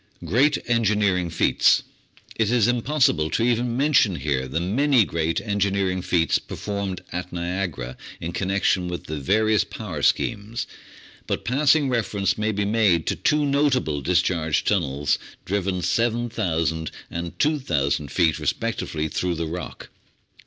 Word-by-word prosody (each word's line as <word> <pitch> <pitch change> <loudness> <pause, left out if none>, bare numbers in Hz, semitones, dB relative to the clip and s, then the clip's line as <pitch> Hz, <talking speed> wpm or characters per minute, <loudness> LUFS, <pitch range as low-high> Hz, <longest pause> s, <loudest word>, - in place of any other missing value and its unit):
Great 135 - +3
Engineering 105 -6 +2
Feats 85 - +3 0.5
It 110 -2 +1
is 120 -2 +3
impossible 125 - +2
to 115 - 0
even 120 0 +1
mention 135 - +3
here 70 -3 -1
the 70 +6 -2
many 120 +6 +3
great 80 -1 -1
en 100 -3 -3
gineering 95 -2 0
feats 85 -3 +2
performed 100 -3 -5
at 90 +1 -5
Niagara 85 -8 -3 0.2
in 85 - -4
connection 95 -1 0
with 90 -1 -5
the 80 -1 -5
various 110 +8 +2
power 95 -10 -6
schemes, 110 +8 0 0.6
but - - -3
passing 140 +3 +3
reference 110 -5 0
may 110 +1 -1
be 100 -1 -1
made 100 -6 +2
to - - 0
two 150 -1 +1
notable 140 - +1
discharge 85 -1 +1
tunnels 75 -8 0 0.3
driven 95 -2 -1
7,000 90 -8 0 0.2
and 85 0 -5
2,000 75 - 0
feet 80 -3 +2
re - - -5
spectively 80 0 -2
through 90 -1 -1
the 85 0 -2
rock. 85 +2 -7
95 Hz, 140 wpm, -23 LUFS, 85-115 Hz, 0.6 s, Great